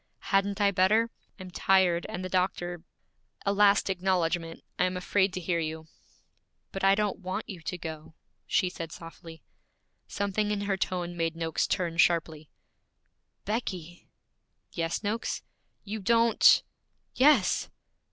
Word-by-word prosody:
'Hadn't 195 Hz, +1 st, +2 dB
I 200 Hz, -1 st, +4 dB
better? 210 Hz, +5 st, +3 dB, 0.3 s
I'm 185 Hz, -1 st, -9 dB
tired, 185 Hz, -2 st, +2 dB
and 185 Hz, +1 st, -5 dB
the -, -, -2 dB
doctor 175 Hz, -2 st, -1 dB, 0.6 s
A 200 Hz, -, +2 dB
last 200 Hz, 0 st, +4 dB
acknowledgment: 175 Hz, -3 st, -1 dB, 0.2 s
I 180 Hz, -, +4 dB
am 185 Hz, 0 st, -2 dB
afraid 190 Hz, +1 st, +1 dB
to 185 Hz, -, -3 dB
hear 170 Hz, -1 st, -1 dB
you.' 160 Hz, 0 st, -4 dB, 0.9 s
'But 195 Hz, -, -5 dB
I 195 Hz, 0 st, +6 dB
don't 210 Hz, -1 st, -1 dB
want 185 Hz, -1 st, -4 dB
you 185 Hz, -4 st, -8 dB
to 180 Hz, -, -4 dB
go,' 160 Hz, -2 st, -8 dB, 0.3 s
she 185 Hz, -, +2 dB
said 165 Hz, -2 st, -6 dB
softly. 165 Hz, -1 st, -11 dB, 0.6 s
Something 200 Hz, +1 st, -1 dB
in 205 Hz, -1 st, -1 dB
her 200 Hz, -1 st, 0 dB
tone 175 Hz, -2 st, -3 dB
made 165 Hz, -1 st, -1 dB
Noakes 165 Hz, -1 st, -1 dB
turn 170 Hz, -3 st, -1 dB
sharply. 160 Hz, -3 st, +1 dB, 1.0 s
'Becky!' 185 Hz, -6 st, -4 dB, 0.6 s
'Yes, 165 Hz, +3 st, -2 dB
Noakes?' 215 Hz, +3 st, -2 dB, 0.4 s
'You 215 Hz, +1 st, -5 dB
don't 230 Hz, +2 st, +5 dB, 0.3 s
' -, -, -47 dB
'Yes!' 260 Hz, -6 st, +3 dB
185 Hz, 140 wpm, -28 LUFS, 170-200 Hz, 1.0 s, I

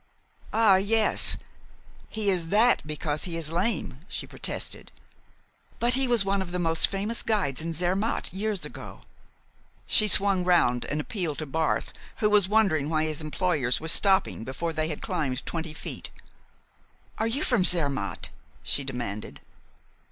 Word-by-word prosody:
"Ah, 215 Hz, -3 st, +5 dB
yes. 215 Hz, +3 st, +3 dB, 0.7 s
He 215 Hz, -2 st, +1 dB
is 175 Hz, -3 st, -1 dB
that 220 Hz, +7 st, +4 dB
because 150 Hz, 0 st, -2 dB
he 170 Hz, -2 st, -2 dB
is 160 Hz, -1 st, -3 dB
lame," 175 Hz, -, -1 dB
she -, -, -5 dB
protested. -, -, -3 dB, 0.9 s
"But 240 Hz, +1 st, +1 dB
he 265 Hz, 0 st, +1 dB
was 235 Hz, -5 st, +3 dB
one 195 Hz, 0 st, +1 dB
of 180 Hz, -2 st, -5 dB
the 180 Hz, -, -2 dB
most 165 Hz, -2 st, +3 dB
famous 205 Hz, +4 st, -1 dB
guides 185 Hz, -, 0 dB
in 165 Hz, +1 st, -3 dB
Zermatt 180 Hz, +8 st, -1 dB
years 205 Hz, 0 st, -2 dB
ago." -, -, -9 dB, 0.8 s
She 215 Hz, -, +4 dB
swung 195 Hz, -2 st, +3 dB
round 170 Hz, -9 st, +3 dB
and 145 Hz, -, -2 dB
appealed 160 Hz, -2 st, -3 dB
to 155 Hz, -, -4 dB
Barth, 160 Hz, +3 st, -1 dB, 0.2 s
who 210 Hz, -3 st, +2 dB
was 205 Hz, -3 st, +4 dB
wondering 190 Hz, -9 st, +2 dB
why 155 Hz, -1 st, +1 dB
his 155 Hz, 0 st, -2 dB
employers 155 Hz, -5 st, 0 dB
were 160 Hz, -, -6 dB
stopping 190 Hz, -, +2 dB
before 165 Hz, +7 st, -4 dB
they 155 Hz, 0 st, -1 dB
had 155 Hz, -2 st, -5 dB
climbed 130 Hz, -4 st, -2 dB
twenty 160 Hz, -2 st, -4 dB
feet. -, -, -5 dB, 1.1 s
"Are 220 Hz, -, +1 dB
you 270 Hz, +7 st, -1 dB
from 245 Hz, -8 st, +2 dB
Zermatt?" 140 Hz, -, +1 dB, 0.3 s
she 140 Hz, -, 0 dB
demanded. 120 Hz, -6 st, -5 dB
175 Hz, 150 wpm, -26 LUFS, 155-205 Hz, 1.1 s, Ah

